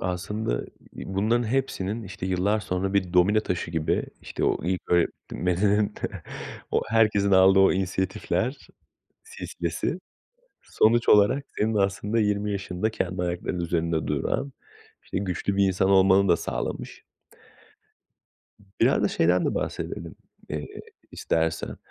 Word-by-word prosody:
aslında 90 - -2 0.3
bunların 110 +5 -1
hepsinin, 115 -4 -1
işte, 95 -2 -6
yıllar 95 +4 +1
sonra 95 -1 -2
bir 95 -3 +1
domino 95 +4 +4
taşı 90 -5 -3
gibi, 80 -2 0 0.2
işte - - -4
o - - 0
ilk 90 0 0
öğretmeninin, 95 +4 +1 0.8
o - - +1
herkesin 105 -3 +3
aldığı 95 0 +6
o 95 - +6
inisiyatifler 95 +6 -2 0.5
silsilesi, 460 +1 -4 0.6
sonuç 115 +2 +2
olarak 105 +7 +5
senin 110 +1 +1
aslında 100 +2 0
20 105 0 0
yaşında 100 +1 -2
kendi 95 -4 -3
ayaklarının 90 0 -2
üzerinde 85 -1 -1
duran, 105 - -1 0.5
işte, - - -3
güçlü 95 +1 -2
bir 100 - +4
insan 95 0 +1
olmanı 95 0 +5
da 85 - +5
sağlamış. - - -5 1.8
Biraz - - +4
da - - +3
şeyden 90 +2 +2
de - - 0
bahsedelim, - - -4 0.3
eee, 75 0 -4 0.4
istersen. 80 0 -1
95 Hz, 120 wpm, -25 LUFS, 90-105 Hz, 1.8 s, aldığı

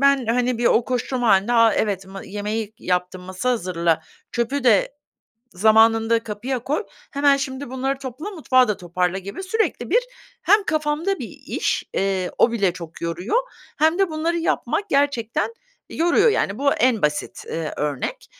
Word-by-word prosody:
ben, 275 -3 +3
hani, 245 +1 +1
bir 240 - +1
o 235 - +4
koşturma 250 -1 -1
hâlinde, 200 +3 +4
"A, 230 -1 +5
evet 195 -3 -1
ma 195 0 -9
yemeği 210 +2 -4
yaptım, 180 -2 -2
masa 185 +7 -2
hazırla, 170 -7 0 0.3
çöpü 250 +4 -1
de 225 -2 +4 0.6
zamanında 225 +3 +4
kapıya 235 +5 -3
koy, 290 - -2 0.3
hemen 280 0 +3
şimdi 275 -1 -5
bunları 265 +1 -2
topla, 270 - -6
mutfağı 260 - +3
da 210 - 0
toparla." 180 +1 -1
gibi 200 - -7
sürekli 440 +4 -1
bir 480 - +5 0.4
hem 415 0 +4
kafamda 310 +5 0
bir - - -6 0.2
iş, - - -1
eee, 190 -2 0
o 235 - +4
bile 200 -6 +1
çok 170 -2 -10
yoruyor, 175 - -1 0.4
hem 320 +3 +3
de 390 -3 +2
bunları 325 +2 -1
yapmak 400 +4 -1
gerçekten 280 - 0 0.4
yoruyor, 345 +7 +3
yani, 205 - 0
bu 280 +1 +3
en 240 -3 +2
basit, 150 0 -1
ııı, 160 -2 -3
örnek. 145 -3 -3
235 Hz, 160 wpm, -22 LUFS, 195-280 Hz, 0.6 s, A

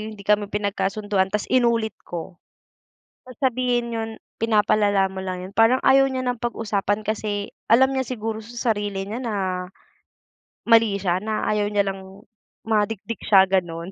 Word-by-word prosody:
hindi 200 - -12
kami 210 0 +2
pinagkasunduan 205 -1 -1
tas 210 +2 -2
inulit 235 -3 +2 0.2
ko, 175 +1 -7 0.9
sasabihin 245 -1 -1
nun, 225 0 -3 0.3
"pinapalala 210 -3 +3
mo 190 - -5
lang" 185 -1 -5
yun, 195 - -11
parang 225 +4 +5
ayaw 270 0 +5
niya 255 -1 -3
ng 245 -2 -2
pag-usapan 210 -3 -1
kasi 210 -1 -3 0.2
alam 265 +4 +5
niya 265 - 0
siguro 225 -3 -4
sa 235 +1 -1
sarili 205 -2 -4
niya 220 +5 -5
na 235 -4 -3 1.3
mali 225 -3 +4
siya, 185 -1 -1
na 215 0 -2
ayaw 210 -1 0
niya 205 -1 +1
lang 195 +1 -7 0.4
madikdik 220 0 -1
siya 195 -2 +6
ganon. 175 -2 -1
210 Hz, 145 wpm, -23 LUFS, 195-230 Hz, 1.3 s, siya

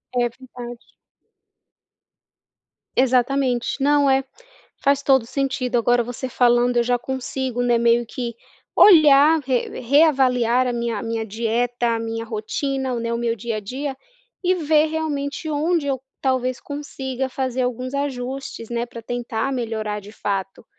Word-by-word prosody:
É 245 -1 +3
verdade. 245 -1 -11 2.0
Exatamente, 255 0 +1
não 285 0 +4
é, 270 0 +3 0.6
faz 280 0 +3
todo 265 -3 +4
o - - -13
sentido 270 -1 -1
agora 240 +1 +3
você 245 +2 -5
falando 245 0 +3
eu 240 - +4
já 245 +1 +1
consigo, 260 -1 -3
né, 240 -1 +3
meio 235 0 +3
que 235 0 -5 0.4
olhar 310 -4 +7
re 260 -3 -2
reavaliar 255 -3 +3
a 245 - 0
minha 235 -2 -2
a - - -5
minha 225 -1 -2
dieta 235 +3 -1
a - - -3
minha 225 0 -4
rotina, 260 +4 -2
né, 230 0 -2
o 235 - -1
meu 235 -1 0
dia 230 0 -4
a 215 - -3
dia 265 +6 -5 0.5
e 365 +1 +3
ver 310 -2 +3
realmente 310 -1 -3
onde 310 +1 0
eu 270 -2 -1 0.2
talvez 255 -1 0
consiga 265 -3 -4
fazer 255 -1 -2
alguns 250 +2 -3
ajustes, 270 -3 -4
né. 235 0 -2
Pra 235 - -9
tentar 240 +1 -3
melhorar 220 -4 -3
de 205 +1 -13
fato 195 -1 -4
250 Hz, 145 wpm, -22 LUFS, 235-275 Hz, 2.0 s, olhar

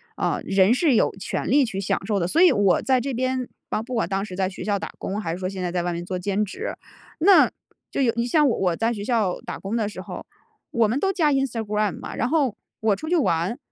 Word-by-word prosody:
啊， - - -1
人 195 +3 +4
是 280 -1 +3
有 - - +3
权 - - -3
利 280 +3 +5
去 195 -4 -4
享 195 - -1
受 210 -2 +1
的。 170 - 0
所 325 - +2
以 365 - +8
我 200 -3 +3
在 260 -1 +2
这 275 +2 -3
边 255 +1 -1 0.2
啊， 215 - -1
不 250 +3 -7
管 225 - +1
当 195 0 -1
时 185 -3 -8
在 190 -1 0
学 185 - -8
校 205 -1 +1
打 - - -6
工， 200 +2 -4
还 165 -5 -3
是 175 - -4
说 185 - -2
现 190 -1 -5
在 175 - -2
在 175 -1 -1
外 175 0 -1
面 170 - -4
做 185 -1 -3
兼 200 +3 0
职， 400 - -5 0.5
那 375 +4 +6 0.4
就 - - -2
有 240 -3 +3
你 235 - +1
像 300 +3 +4
我 185 -6 +1
在 225 +6 0
学 205 - -5
校 215 -7 +1
打 - - -5
工 200 +4 -4
的 215 -3 0
时 190 -3 -7
候， - - -8 0.5
我 235 -6 +3
们 255 +6 0
都 390 0 +1
加 315 -5 +2
Instagram 220 -7 -1
嘛， - - -7
然 240 - 0
后 270 -6 +1 0.3
我 220 -2 +3
出 310 - -8
去 350 - +2
玩， 185 - +1
215 Hz, 310 characters per minute, -24 LUFS, 190-260 Hz, 0.5 s, 以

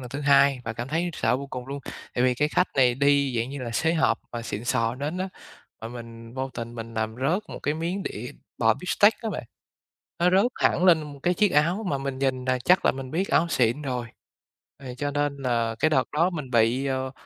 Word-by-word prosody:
lần 125 - -8
thứ 140 - -4
hai 140 -2 +4
và 115 - -3
cảm 120 +3 -5
thấy 165 +4 0
sợ 125 - +1
vô 140 +1 -6
cùng 125 -2 -7
luôn. 140 +1 -5 0.3
Tại 125 - +2
vì 125 -1 +3
cái 150 +4 +1
khách 180 +3 +2
này 125 -2 +5
đi, 140 -1 +2
dạng 115 +3 -1
như 140 - -6
là, 120 - -4
xế 160 +8 +1
hộp 155 -8 +2
mà 120 -1 -4
xịn 110 -1 -5
sò 115 -1 +1
đến 145 +7 -4
á, 190 +1 -2 0.5
mà 115 - -6
mình 115 0 -10
vô 130 0 -3
tình 115 0 -6
mình 115 0 -7
làm 110 0 -2
rớt 155 - 0
một - - -7
cái 150 - -1
miếng 170 +5 -2
đĩa 120 - -5 0.3
bò 115 -1 +4
beefsteak 205 - +3
á 225 - -2
bạn, - - -5 0.8
nó 175 +1 +4
rớt 200 +7 +4
hẳn 180 - +2
lên 155 -5 +3
cái 180 - +3
chiếc 205 0 +2
áo 170 +8 +2
mà 140 - 0
mình 135 -1 -4
nhìn 130 -2 0
là 130 -1 +1
chắc 180 +9 +3
là - - +5
mình 130 -1 -7
biết 185 +5 0
áo 170 - +3
xịn 125 0 +1
rồi. 125 -4 -3 0.8
Thì 125 -2 -7
cho 145 +2 -2
nên 145 0 -1
là 115 -4 0
cái 155 - +3
đợt 130 -4 +1
đó 165 +4 +2
mình 150 -7 -6
bị, 120 +3 +3
ờ, 130 -1 -2
135 Hz, 240 wpm, -25 LUFS, 120-155 Hz, 0.8 s, này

